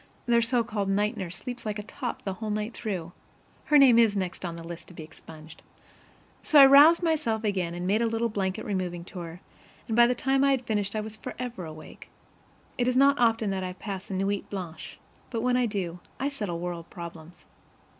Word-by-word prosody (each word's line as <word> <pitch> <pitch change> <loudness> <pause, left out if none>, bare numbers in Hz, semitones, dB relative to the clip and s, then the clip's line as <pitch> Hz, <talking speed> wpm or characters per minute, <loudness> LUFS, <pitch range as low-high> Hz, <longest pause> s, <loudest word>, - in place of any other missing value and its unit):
Their 235 -1 +3
so 235 +1 +1
called 210 -3 -3
night 210 +3 +1
nurse 185 -4 -5
sleeps 245 +5 -6
like 215 -1 -3
a 210 - -5
top 245 +3 -6
the 195 - -3
whole 215 +3 -6
night 210 +2 -2
through. 185 -8 -4 0.5
(Her 300 - +5
name 255 -4 +7
is 220 -3 +4
next 185 -1 -3
on 170 -2 -4
the 165 - -9
list 170 -1 -9
to 180 - -14
be 160 - -8
expunged.) 155 0 -13 0.8
So 300 - +5
I 275 - +11
roused 290 +6 +7
myself 290 -10 0
again, 185 -5 -1
and 175 0 -4
made 205 +4 +2
a 235 - +2
little 225 +1 0
blanket 200 -1 -3
removing 180 -4 -3
tour, 175 -1 -9 0.5
and 225 - -1
by 240 0 +7
the 250 - +1
time 270 +2 +1
I 280 - +4
had 255 -2 -2
finished 205 -2 -1
I 215 - 0
was 215 0 -8
forever 245 -5 -6
awake. 155 0 -11 0.7
It 245 - +2
is 255 0 +2
not 280 +1 +5
often 225 -3 +2
that 190 -1 -2
I 180 0 -4
pass 195 +1 -7
a 195 - -3
NUIT 195 +1 -1
BLANCHE; 170 -5 -7 0.3
but 230 -3 -3
when 250 0 +2
I 250 -1 +2
do, 180 -5 -4 0.2
I 275 +3 0
settle 210 -12 -4
world 170 -1 -5
problems. 170 -1 -10
210 Hz, 215 wpm, -27 LUFS, 180-240 Hz, 0.8 s, I